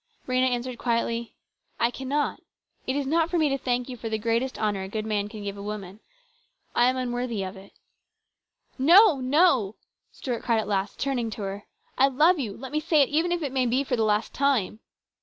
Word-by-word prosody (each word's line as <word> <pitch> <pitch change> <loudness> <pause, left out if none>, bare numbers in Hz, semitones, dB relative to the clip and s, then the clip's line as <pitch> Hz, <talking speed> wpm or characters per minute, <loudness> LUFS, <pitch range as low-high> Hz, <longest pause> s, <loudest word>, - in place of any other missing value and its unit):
Rhena 255 0 +2
answered 245 0 -3
quietly: 235 -1 -1 0.2
" - - -43
I 235 - +2
cannot. 270 +4 -2 0.5
It 260 - 0
is 285 -1 -1
not 325 +4 +1
for 350 - 0
me 310 -3 +3
to 275 - 0
thank 245 -1 -1
you 255 - -6
for 230 -1 -6
the 220 - -1
greatest 230 +4 -1
honour 205 -2 -1
a 190 - -5
good 215 +1 -3
man 205 -2 -1
can 215 -1 -8
give 200 0 -5
a - - -7
woman. 205 -1 -6 0.7
I 240 +1 +4
am 260 - -1
unworthy 245 -4 -2
of 190 +1 -6
it." 195 +1 -14 0.6
" - - -42
No! 370 -6 +8
no! 255 - +3 0.2
" - - -51
Stuart 245 -3 -4
cried 230 -2 +1
at 220 - -1
last, 200 0 -1
turning 255 -4 -1
to 215 -1 -6
her. 195 +1 -5 0.2
" - - -38
I 270 - +6
love 305 +6 +3
you. 215 -7 -4
Let 260 +1 -8
me 305 - 0
say 310 -2 +3
it - - -2
even 325 +4 +1
if 350 -2 -1
it 280 - -2
may 260 -2 +1
be 255 +4 +1
for 260 - -1
the 225 - -1
last 215 0 +1
time." 260 -7 +1
245 Hz, 230 wpm, -26 LUFS, 215-275 Hz, 0.7 s, No